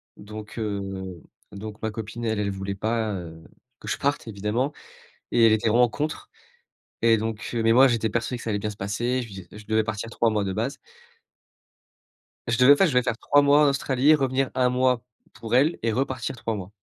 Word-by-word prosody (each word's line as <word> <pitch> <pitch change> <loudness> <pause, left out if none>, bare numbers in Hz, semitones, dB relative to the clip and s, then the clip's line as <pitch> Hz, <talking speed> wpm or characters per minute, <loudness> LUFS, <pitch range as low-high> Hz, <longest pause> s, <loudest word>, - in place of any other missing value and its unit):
donc 105 +2 -9
heu, 95 -4 -5 0.3
donc 105 +1 -8
ma 110 - -1
copine, 115 +2 -7
elle, 110 -2 0
elle 100 -1 -1
voulait 95 0 -4
pas, 110 +1 -1
heu, 80 -2 -8 0.4
que - - -12
je - - -1
parte 140 -4 -1
évidemment! 110 +7 -1 0.6
Et 115 - +5
elle 110 - +6
était 110 +1 +2
vraiment 120 +2 +4
contre, 150 +5 -4 0.7
et 115 -1 +5
donc 110 0 -4
mais 115 -1 +2
moi, 135 +2 +7
j'étais 115 -3 +1
persuadé 115 +3 -2
que - - -10
ça - - -4
allait 105 -1 0
bien 105 +1 -3
se 105 - -10
passer, 120 +6 -1
je 120 - -5
lui 100 - -12
dis 95 -2 -9
je 105 0 -12
devais 110 0 +1
partir 110 +1 -4
3 115 0 +1
mois 105 -2 0
de 95 -1 -3
base. 115 +7 -2 1.7
Je 115 0 +1
devais 135 +3 +7
pas, 195 - +4
je 160 - +1
devais 125 - +3
faire 115 - -2
3 145 +3 +3
mois 145 +1 +5
en - - +5
Australie, 140 +2 +3
revenir 135 -2 0
1 125 -1 +3
mois 125 -1 +2 0.3
pour 115 +1 -3
elle 145 +6 +3
et 115 -1 0
repartir 130 0 -2
3 115 -1 -3
mois. 100 0 -7
115 Hz, 215 wpm, -25 LUFS, 105-125 Hz, 1.7 s, moi